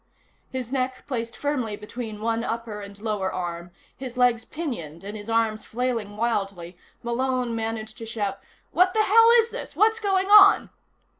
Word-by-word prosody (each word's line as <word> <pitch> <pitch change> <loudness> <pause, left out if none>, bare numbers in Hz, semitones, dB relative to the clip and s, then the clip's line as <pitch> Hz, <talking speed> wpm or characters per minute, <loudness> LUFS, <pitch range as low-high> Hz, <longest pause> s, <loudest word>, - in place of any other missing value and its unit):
His 255 -2 -5
neck 255 -1 -2
placed 235 -4 -4
firmly 255 -7 -2
between 215 0 -7
one 230 +1 0
upper 230 -3 -4
and 200 0 -10
lower 210 -3 -2
arm, 170 -1 -5 0.3
his 255 -2 -8
legs 245 -2 +3
pinioned 210 - -6
and 205 +2 -6
his 210 +1 -8
arms 225 -1 +1
flailing 230 -4 -3
wildly, 195 -6 -2 0.3
Malone 250 0 -1
managed 220 -1 -4
to 225 - -7
shout: 210 -3 -3 0.3
"What 365 +2 +3
the 435 - +4
hell 455 +3 +6
is 460 0 +2
this? - - -7
What's 445 +1 +3
going 390 -3 +1
on?" 420 -1 +8
230 Hz, 160 wpm, -25 LUFS, 210-260 Hz, 0.3 s, on